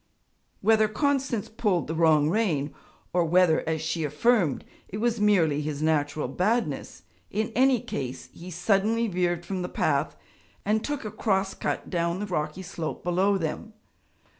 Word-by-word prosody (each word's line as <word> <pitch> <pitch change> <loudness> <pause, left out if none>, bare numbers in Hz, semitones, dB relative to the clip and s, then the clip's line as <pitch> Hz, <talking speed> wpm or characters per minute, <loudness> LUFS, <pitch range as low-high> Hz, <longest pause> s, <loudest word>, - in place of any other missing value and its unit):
Whether 220 +1 +4
Constance 260 0 0
pulled 205 -7 0
the 160 - -4
wrong 160 -3 +4
rein, 160 -7 0 0.4
or 175 -1 +3
whether, 170 0 +4
as 160 -1 -1
she 160 0 -1
affirmed, 155 - +1 0.2
it 200 - -6
was 230 0 0
merely 165 -8 +3
his 150 0 -3
natural 150 -1 +1
badness, 190 - -1 0.3
in 215 +3 -1
any 260 0 +4
case, 130 -9 -5
he 175 +2 -10
suddenly 200 +6 +1
veered 175 -3 -1
from 185 +1 -3
the 180 - -3
path - - 0 0.5
and 215 +2 +1
took 290 -5 -3
a 215 - -4
cross 195 -3 0
cut - - -3
down 170 0 0
the 210 - -2
rocky 165 -1 -3
slope 165 -2 -5
below 190 +3 +2
them. 190 +6 -4
185 Hz, 155 wpm, -26 LUFS, 160-215 Hz, 0.5 s, Whether